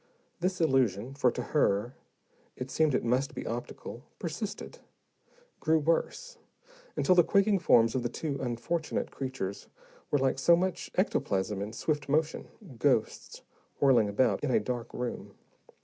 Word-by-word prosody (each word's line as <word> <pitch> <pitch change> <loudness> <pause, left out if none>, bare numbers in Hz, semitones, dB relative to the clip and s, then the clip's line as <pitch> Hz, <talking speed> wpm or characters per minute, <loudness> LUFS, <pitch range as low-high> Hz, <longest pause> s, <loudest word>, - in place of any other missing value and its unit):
This 185 +1 -1
illusion 130 - +1
for 135 -2 +3
to - - -4
her, 120 -5 +2 0.6
it 130 +1 -6
seemed 155 -2 +2
it - - 0
must 130 +5 0
be - - -5
optical 120 0 -6 0.2
persisted, 205 - -5 0.8
grew 160 0 +3
worse, 315 - -1 0.6
until 185 - +3
the 175 -1 +6
quaking 200 +2 +3
forms 115 -7 +4
of 130 - 0
the 120 - -2
two 140 +2 -4
unfortunate 130 +6 -2
creatures 130 -8 -5 0.4
were 145 - +3
like 135 -1 +1
so 170 +5 +6
much 185 +1 -2
ectoplasm 100 - 0
in 105 +2 -4
swift 145 +5 -2
motion, 155 +2 0 0.3
ghosts 130 -6 0 0.4
whirling 120 -7 +4
about 105 +8 +1
in 145 - 0
a 125 - +4
dark 120 +2 -4
room. 125 -1 -5
135 Hz, 145 wpm, -30 LUFS, 120-160 Hz, 0.8 s, the